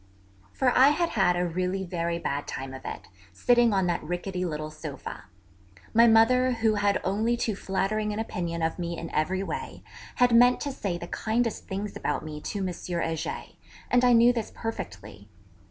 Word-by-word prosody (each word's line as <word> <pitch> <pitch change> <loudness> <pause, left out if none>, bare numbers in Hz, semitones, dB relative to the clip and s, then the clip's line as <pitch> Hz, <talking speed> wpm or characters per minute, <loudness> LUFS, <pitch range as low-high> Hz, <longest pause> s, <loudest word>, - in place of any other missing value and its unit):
For 255 -2 +1
I 265 - +7
had 335 +4 +2
had 190 -5 +2
a 180 - +1
really 185 +3 -2
very 170 -2 -2
bad 145 -4 -3
time 130 0 -5
of 130 - -8
it, - - -6 0.3
sitting 240 - +4
on 190 -2 +2
that 175 - 0
rickety 180 +2 -3
little 155 -3 -4
sofa. 155 -7 -8 0.7
My 230 +1 +7
mother, 250 +3 +5
who 225 -2 +2
had 205 -1 +1
only 220 +5 +1
too 220 -3 -1
flattering 205 +3 -1
an 210 - -4
opinion 170 -6 -3
of 160 +2 -1
me 170 -1 -3
in 165 - -6
every 185 +5 0
way, - - -6 0.3
had 245 -1 +4
meant 245 +1 +6
to 285 - -2
say 195 -9 -3
the 175 - -7
kindest 225 +5 -2
things 200 +1 -4
about 150 - -2
me 150 -1 -7
to 195 +2 -3
M. 180 - -3
Heger, 170 -2 -3 0.5
and 245 0 +4
I 245 -1 +6
knew 235 +1 +6
this 230 -3 -3
perfectly. 105 - -7
190 Hz, 185 wpm, -27 LUFS, 170-230 Hz, 0.7 s, I